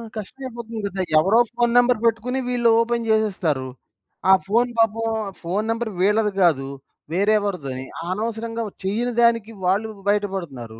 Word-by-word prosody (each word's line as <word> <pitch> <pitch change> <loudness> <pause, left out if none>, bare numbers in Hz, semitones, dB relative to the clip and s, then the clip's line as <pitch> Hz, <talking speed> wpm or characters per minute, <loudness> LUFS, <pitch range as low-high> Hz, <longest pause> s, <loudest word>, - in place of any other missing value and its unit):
కష్టం 215 +6 -8
అయిపోతుంది 230 -2 -7
గదా! 195 -1 -3 0.2
ఎవరో 200 +8 +4
ఫోన్ 240 0 +1
నంబర్ 245 -2 +4
బెట్టుకొని 235 +3 +1
వీళ్ళు 240 -2 +2
ఓపెన్ 235 0 -1
జేసేస్తారు. 185 -11 +1 0.6
ఆ - - +9
ఫోన్ 235 +4 +2
పాపం 225 0 +2 0.4
ఫోన్ 190 +5 -2
నంబర్ 230 -1 -2
వీళ్ళది 210 +2 +2
గాదు. 140 -6 +3 0.5
వేరే 200 +4 +3
ఎవరిదోని. 140 -10 -4 0.2
అనవసరంగా 225 +3 -3 0.2
చెయ్యని 230 +5 -1
దానికి 230 -2 +3
వాళ్ళు 205 +4 +1 0.2
బయటపడుతున్నారు. 170 - -3
215 Hz, 135 wpm, -22 LUFS, 190-230 Hz, 0.6 s, ఆ